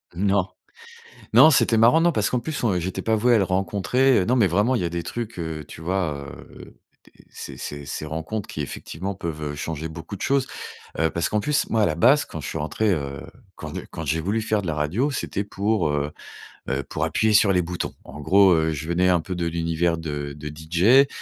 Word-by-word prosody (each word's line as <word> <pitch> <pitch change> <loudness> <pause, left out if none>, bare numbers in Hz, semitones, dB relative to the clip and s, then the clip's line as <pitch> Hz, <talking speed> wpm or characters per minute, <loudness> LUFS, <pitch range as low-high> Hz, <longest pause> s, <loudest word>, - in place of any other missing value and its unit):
Non, 100 0 +1 0.9
non, 135 +8 +8
c'était 120 -5 +3
marrant, 120 +8 +6
non 175 +1 +4
parce 110 -9 0
qu'en 125 - 0
plus, 145 +3 -4
on 110 - +3
heu, 90 - 0
j'étais 95 +3 -4
pas 110 - +1
voué 120 +3 +3
à - - +5
le 100 - +3
rencontrer, 100 +8 +2
heu, 90 - +2
non, 125 - +1
mais 110 -7 +4
vraiment, 105 +9 +2
il - - +1
y - - -1
a - - 0
des 85 -1 -4
trucs, 115 -3 -5
heu, 80 -3 -4
tu - - -11
vois, 80 -5 -2 0.3
heu - - -14
heu, - - -12 0.3
des - - -22 0.2
ces - - -9
ces 70 -1 -7
ces 75 - -5
rencontres 80 +7 -4
qui, 75 - -6
effectivement, 90 +7 -5
peuvent, 80 -4 -5
heu, - - -8
changer 80 +1 -4
beaucoup 80 +5 -8
de - - -9
choses. 135 -1 +1 0.5
Heu, 80 0 +3
parce 85 -1 -1
qu'en 105 - +1
plus, 150 +7 0
moi, 110 -1 +2
à - - +5
la 80 - -1
base, 130 - +4
quand 80 - -7
je - - -6
suis - - -4
rentré, 100 +8 0
heu, 70 -4 -3 0.3
quand - - -8
j'ai - - -6
quand 80 - -6
j'ai 80 +3 0
voulu 100 +6 0
faire 110 -1 0
de 95 - -6
la 80 - -1
radio, 90 - 0
c'était 105 -6 -3
pour, 100 -3 0
heu 75 0 -1 0.6
heu, 65 +1 -1
pour - - -3
appuyer 110 0 +1
sur 105 -1 +5
les 90 -2 +2
boutons. 90 +1 -4
En 75 - -10
gros, 95 +4 +5
heu, 80 -1 +2
je 80 +1 -5
venais 90 +2 +2
un 90 - +4
peu 90 +3 -5
de 85 -1 -1
l'univers 85 0 0
de 75 -3 -4
de 75 +1 -8
DJ. 85 - +4
90 Hz, 245 wpm, -23 LUFS, 80-110 Hz, 0.9 s, non